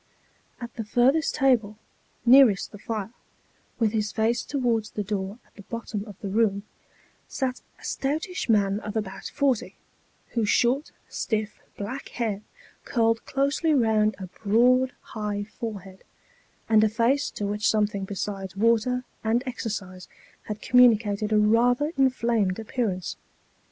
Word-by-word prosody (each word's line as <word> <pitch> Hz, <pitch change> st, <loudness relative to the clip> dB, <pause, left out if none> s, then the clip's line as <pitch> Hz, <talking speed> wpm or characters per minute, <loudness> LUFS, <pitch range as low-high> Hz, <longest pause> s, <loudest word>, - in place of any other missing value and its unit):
At 235 Hz, -1 st, -7 dB
the 225 Hz, -, -4 dB
furthest 255 Hz, +8 st, +2 dB
table, 235 Hz, -7 st, +2 dB, 0.5 s
nearest 245 Hz, -5 st, +6 dB
the 205 Hz, -, -11 dB
fire, 215 Hz, -1 st, -4 dB, 0.7 s
with 225 Hz, -3 st, +2 dB
his 215 Hz, -1 st, -1 dB
face 230 Hz, +2 st, +1 dB
towards 240 Hz, -6 st, -1 dB
the 210 Hz, -, -4 dB
door 200 Hz, 0 st, -3 dB
at -, -, -30 dB
the 205 Hz, -, -12 dB
bottom 210 Hz, -1 st, -5 dB
of 205 Hz, -3 st, -10 dB
the 200 Hz, -, -4 dB
room, 200 Hz, -1 st, +1 dB, 0.6 s
sat 260 Hz, -2 st, -3 dB, 0.2 s
a -, -, -18 dB
stoutish 310 Hz, +4 st, -2 dB
man 200 Hz, -2 st, +3 dB
of 215 Hz, 0 st, -5 dB
about 195 Hz, -3 st, -5 dB
forty, 275 Hz, -5 st, 0 dB, 0.5 s
whose 225 Hz, -4 st, -1 dB
short, 255 Hz, +5 st, +2 dB, 0.2 s
stiff, 215 Hz, -2 st, -3 dB, 0.2 s
black 240 Hz, +7 st, -5 dB
hair 215 Hz, -4 st, -2 dB, 0.4 s
curled 230 Hz, -2 st, +1 dB
closely 280 Hz, +3 st, +1 dB
round 220 Hz, -4 st, +3 dB
a 190 Hz, -, -6 dB
broad 245 Hz, +7 st, +2 dB, 0.2 s
high 210 Hz, -2 st, -2 dB
fore 215 Hz, -1 st, -6 dB
head, 190 Hz, 0 st, -15 dB, 0.6 s
and 220 Hz, -1 st, +5 dB
a 220 Hz, -, +4 dB
face 235 Hz, +6 st, +1 dB
to 205 Hz, -, -5 dB
which 210 Hz, +1 st, 0 dB
something 210 Hz, -2 st, +1 dB
besides 195 Hz, -1 st, -5 dB
water 230 Hz, +3 st, +2 dB, 0.2 s
and 230 Hz, +3 st, +1 dB
exercise 200 Hz, -7 st, -5 dB, 0.4 s
had 210 Hz, 0 st, -6 dB
communicated 220 Hz, -4 st, +4 dB
a 215 Hz, -, +4 dB
rather 245 Hz, +7 st, +3 dB
inflamed 235 Hz, -8 st, +1 dB
appearance. 220 Hz, -5 st, -3 dB
220 Hz, 140 wpm, -26 LUFS, 205-245 Hz, 0.7 s, nearest